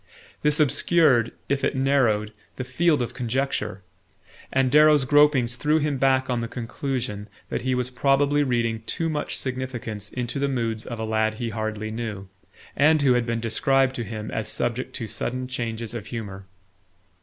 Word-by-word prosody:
This 150 0 +3
obscured, 145 -5 +3 0.2
if 140 0 -1
it - - +1
narrowed, 125 -6 +2 0.2
the 130 - -4
field 145 +2 +2
of 120 - -5
conjecture; 130 -5 -2 0.7
and 130 -1 +2
Darrow's 150 -1 +6
gropings 135 -4 +4
threw 150 +5 +2
him 145 -3 -1
back 130 0 +3
on 125 -2 -1
the 115 - -3
conclusion 115 -3 -4 0.2
that - - -2
he 130 0 0
was 125 0 -2
probably 140 +3 +2
reading 115 -4 0
too 165 -1 -1
much 150 -2 -2
significance 125 -6 -4
into 125 +1 -3
the 140 0 +1
moods 115 -4 -2
of 120 - -5
a 110 - -3
lad 110 0 0
he 115 +1 -3
hardly 110 -1 -3
knew, 110 -4 -5 0.5
and 150 +1 +4
who 130 -3 +5
had 120 -1 +1
been 115 0 -1
described 130 +4 +2
to 120 - -2
him 110 0 -6
as 110 -1 -2
subject 120 +1 -2
to 115 - -3
sudden 125 +3 -3
changes 115 -3 -4
of 115 -4 -6
humour. 100 -5 -7
125 Hz, 170 wpm, -24 LUFS, 115-135 Hz, 0.7 s, Darrow's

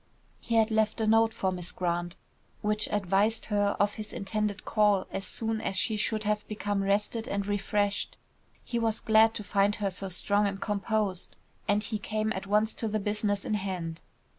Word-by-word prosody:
He 230 - -2
had 225 0 +4
left 220 0 +1
a 220 - +1
note 225 +1 +4
for 190 -4 -1
Miss 180 -1 -2
Grant, 175 0 -2 0.5
which 210 0 +1
advised 205 +2 +1
her 205 0 +2
of 205 0 +3
his 215 -1 -6
intended 210 0 -2
call 210 -3 +3
as 195 - -3
soon 225 -1 -1
as 195 - -1
she 215 +3 +1
should 215 0 -1
have 210 0 -1
become 205 -1 -1
rested 205 +4 0
and 200 -3 -1
refreshed. 205 0 0 0.5
He 235 - -2
was 225 -1 0
glad 220 0 +5
to 210 - -3
find 200 +1 +2
her 200 -3 -1
so 190 +1 -2
strong 205 +3 +2
and 195 -1 -3
so - - -18
composed, 205 -2 -1 0.3
and 205 +1 +2
he 220 -2 -2
came 215 +2 -1
at 190 +1 -5
once 210 +2 +2
to 225 - 0
the 215 0 0
business 205 -1 -1
in - - -1
hand. 185 -5 -3
210 Hz, 190 wpm, -29 LUFS, 195-215 Hz, 0.5 s, glad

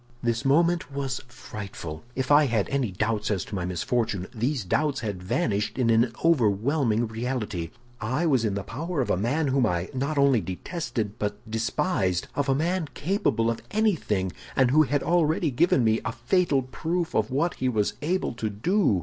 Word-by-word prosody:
"This 120 +1 0
moment 165 +3 +2
was 135 -1 -3
frightful; 105 -10 -8
if 130 +1 -1
I 145 0 +6
had 115 -5 +1
any 135 -5 0
doubts 105 +3 -1
as 100 -4 -1
to - - -11
my 95 -3 -2
misfortune, 95 +2 -1
these 120 0 -1
doubts 145 - 0
had 100 -5 -4
vanished 100 +4 -1
in 120 -3 +3
an 115 +1 +3
overwhelming 120 -3 +2
reality. 110 -6 -3 0.3
I 130 +10 -1
was 135 -7 +3
in 105 -3 0
the 100 - -3
power 160 - -3
of 125 - -1
a - - +3
man 135 - 0
whom 130 -3 +3
I 90 -1 -1
not 140 +3 -2
only 140 -5 +4
detested, 110 - -4
but 105 0 -2
despised—of 115 - -1
a 135 - +4
man 170 +3 0
capable 145 - +1
of 115 - -5
anything, 165 - +1 0.2
and 130 -2 +4
who 155 +3 +6
had 145 -1 +1
already 165 -2 +2
given 130 0 +3
me 110 0 +3
a - - -3
fatal 140 +3 +1
proof 165 +6 -2
of 110 0 +1
what 145 +7 +1
he 130 - 0
was 105 -4 0
able 175 +1 0
to 115 -2 -3
do." 110 - +2
125 Hz, 180 wpm, -26 LUFS, 105-150 Hz, 0.3 s, I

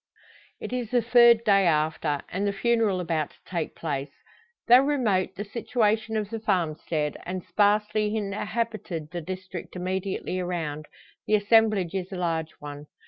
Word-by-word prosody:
It - - -6
is 245 -3 -2
the 245 -1 +2
third 235 -1 +6
day 195 -4 +4
after, 155 -2 +1
and 200 +3 -1
the - - +1
funeral 220 -2 +1
about 165 -4 -1
to - - -23
take 170 -4 -4
place. 140 -3 -3 0.6
Though 245 +2 +9
remote 225 -10 +1
the 205 - -5
situation 220 0 0
of 210 0 -3
the 225 - -3
farm 180 -7 +1
stead, 150 -1 -3
and 185 0 -5
sparsely 210 +1 +1
inhabited 210 -5 -3
the 175 0 -4
district 185 +1 -7
immediately 185 0 -3
around, 160 -4 -3 0.4
the 215 - +4
assemblage 210 -4 +3
is 190 -1 -3
a - - -4
large 165 -3 -1
one. 145 0 -9
195 Hz, 155 wpm, -26 LUFS, 170-220 Hz, 0.6 s, Though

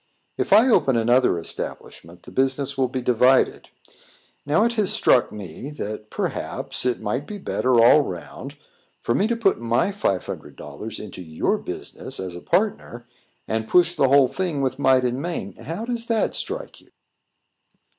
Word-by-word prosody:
If - - -3
I 220 +6 +7
open 150 - +3
another 120 -3 +3
establishment, 85 +1 -6
the - - -12
business 135 +1 0
will 135 -1 +1
be 130 0 -4
divided. 125 +2 +3 0.8
Now, 155 +8 +3
it 235 +1 +1
has 215 -4 +1
struck 125 - +3
me, 105 - -8
that, 105 -1 -6
perhaps, - - -3
it 125 - 0
might 120 +6 -3
be 210 - -6
better, 130 -10 +1
all 120 +6 +7
round, 90 - -7 0.4
for 120 - -1
me 200 - +2
to 235 - 0
put 220 -4 +1
my 120 +11 +1
five 100 - -1
hundred - - -8
dollars 110 - -8
into 100 -3 -9
your 80 -2 -1
business - - -6
as 90 -2 -5
a 90 - -8
partner, 120 - -1 0.4
and 110 0 -2
push 175 -1 +4
the 140 -4 +3
whole 140 -1 +6
thing 150 0 -2
with 130 0 -2
might 130 -2 +4
and 125 +2 -1
main. 150 - -4
How 170 +9 -5
does 235 -1 -4
it 225 -2 +1
strike - - -5
you?" - - -25
130 Hz, 170 wpm, -23 LUFS, 115-175 Hz, 0.8 s, I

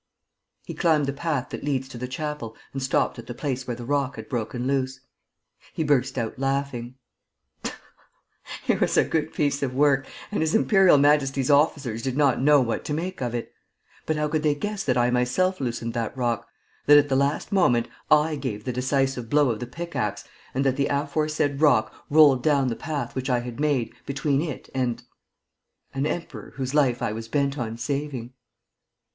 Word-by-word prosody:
He - - -6
climbed 160 -5 +2
the 140 - -2
path 145 -2 -2
that - - -6
leads 135 -2 -1
to 125 - -9
the 125 - -3
chapel 140 -4 -5 0.2
and 135 - -3
stopped 130 -1 0
at 115 - -10
the 120 - -6
place 130 -2 -3
where 120 - -2
the 120 0 -8
rock 140 0 0
had 110 -1 -8
broken 120 +1 -3
loose. 135 -1 -1 0.7
He 160 - -1
burst 135 -3 +1
out 115 0 -3
laughing: 135 -3 -2 1.7
"It - - +2
was - - +2
a - - +6
good 160 -1 -1
piece 145 -1 0
of 130 -2 -2
work 140 -1 +3 0.2
and 210 - -1
His 160 +3 +1
Imperial 195 -7 +5
Majesty's 140 -1 +3
officers 140 -6 +2
did 130 +1 -2
not 140 -4 +3
know 145 +1 +6
what 115 -2 -1
to 150 - -2
make 180 0 -4
of 120 -1 -2
it. 120 - -5 0.5
But 155 - +1
how 150 0 0
could 155 +1 0
they 150 -1 +2
guess 205 +6 -3
that 130 -2 +1
I 120 0 +3
myself 125 +9 +1
loosened 120 -2 -3
that 115 +2 -3
rock, 120 -2 -1 0.4
that, 145 0 +9
at 145 0 +5
the 135 - +1
last 140 +2 0
moment, 120 - +3 0.2
I 150 0 +4
gave 120 -7 -4
the 125 - -3
decisive 130 -1 0
blow 145 -2 +4
of 110 - -4
the 125 - -5
pick 170 +7 -7
axe 105 -2 -2 0.3
and 135 +1 +1
that 135 0 +2
the 140 - +1
aforesaid 145 0 -1
rock 125 -8 +4 0.2
rolled 145 -4 +6
down 140 -2 +2
the 115 - -2
path 145 -4 -4
which 130 +1 -3
I 125 -1 +2
had 120 +1 -7
made 145 -6 0
between 140 0 0
it 155 -5 -5
and... 125 -3 -1 0.9
an 135 +2 0
emperor 170 +1 -5
whose 130 0 -3
life 135 -5 +2
I - - 0
was 115 +1 -6
bent 140 +2 0
on 115 -1 -3
saving?" 135 -2 -3
135 Hz, 195 wpm, -25 LUFS, 125-150 Hz, 1.7 s, that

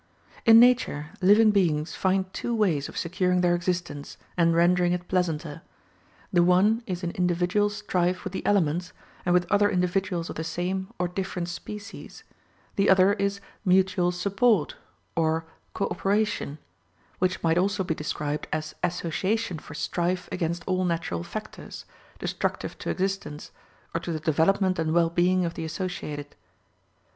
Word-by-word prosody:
In 225 0 +10
nature, 235 -11 +3
living 210 +3 +6
beings 160 -6 +1
find 190 0 +1
two 235 - -2
ways 175 -10 +1
of - - -9
securing 180 +1 +1
their 175 -1 +3
existence, 175 -4 -3 0.2
and 170 -1 +3
rendering 175 +1 +3
it 180 0 -4
pleasanter. 165 -4 -1 0.7
The 175 - +5
one 190 +6 +4
is 180 -1 -4
in 170 - -1
individual 180 +4 +1
strife 185 -3 -1
with 190 -2 -5
the - - -4
elements, 180 -2 +1 0.3
and - - +3
with 180 0 +3
other 205 0 +4
individuals 180 -2 0
of - - -7
the 160 - -2
same 180 +3 -2
or 180 - 0
different 180 -1 -4
species; 205 +4 -8 0.5
the 200 0 +3
other 190 +1 +6
is 200 -1 -1 0.2
mutual 185 -2 +3
support, 200 0 +1 0.4
or 160 -1 +1 0.3
co - - 0
operation, 195 -4 -1 0.6
which 185 0 0
might 165 +1 +3
also 195 +1 +1
be 170 - -1
described 150 -1 -3
as 155 -1 -3
association 180 +3 -1
for 150 - -11
strife 180 +3 -1
against 170 -1 -2
all 185 -1 0
natural 170 -2 -1
factors, 215 +6 -8 0.3
destructive - - -3
to - - -4
existence, 190 -6 -3 0.4
or 165 - 0
to 170 - -5
the 160 - -2
development 175 +5 +2
and 160 0 0
well 170 -1 +3
being 180 +1 +2
of 170 - -3
the - - -5
associated. 155 -4 -5
180 Hz, 150 wpm, -26 LUFS, 170-195 Hz, 0.7 s, In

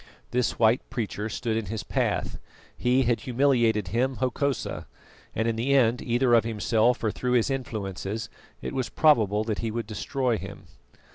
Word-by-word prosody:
This 125 -1 0
white 115 +2 +4
preacher 110 -4 -3
stood 110 +1 -2
in 110 -3 -2
his 110 +2 -4
path; - - -1 0.4
he 125 +2 +2
had 120 -2 +1
humiliated 120 -5 +2
him, 125 +6 0
Hokosa, 130 +3 -2 0.5
and 110 +1 0
in 115 - 0
the 135 +5 +2
end, 120 -2 +3
either 120 +1 +2
of 115 - +6
himself 115 +2 +1
or 110 - +1
through 125 +3 -2
his 125 +2 +2
influences, 110 -4 -4 0.4
it - - -4
was 130 -2 -2
probable 110 -9 +3
that 110 -2 -2
he 115 - -2
would 115 +1 -3
destroy 120 +1 -1
him. - - -9
115 Hz, 165 wpm, -26 LUFS, 110-125 Hz, 0.5 s, of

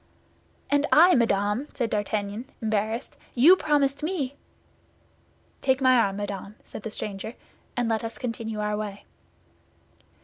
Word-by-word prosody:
"And 285 0 +3
I, 350 +4 +7
madame!" 210 - +1
said 235 -4 -1
D'Artagnan, 210 +3 -2
embarrassed; 220 +2 -2 0.2
"you 300 +10 +8
promised 290 -4 +1
me—" 300 -5 -2 1.3
"Take 265 -1 +2
my 255 -1 +5
arm, 200 -5 +3
madame," 200 0 -5
said - - -9
the 220 - -5
stranger, 210 +2 -5 0.4
"and 245 -1 +1
let 225 -1 0
us 225 0 -5
continue 225 -3 -4
our 210 0 0
way." 205 -1 -5
225 Hz, 130 wpm, -26 LUFS, 210-270 Hz, 1.3 s, you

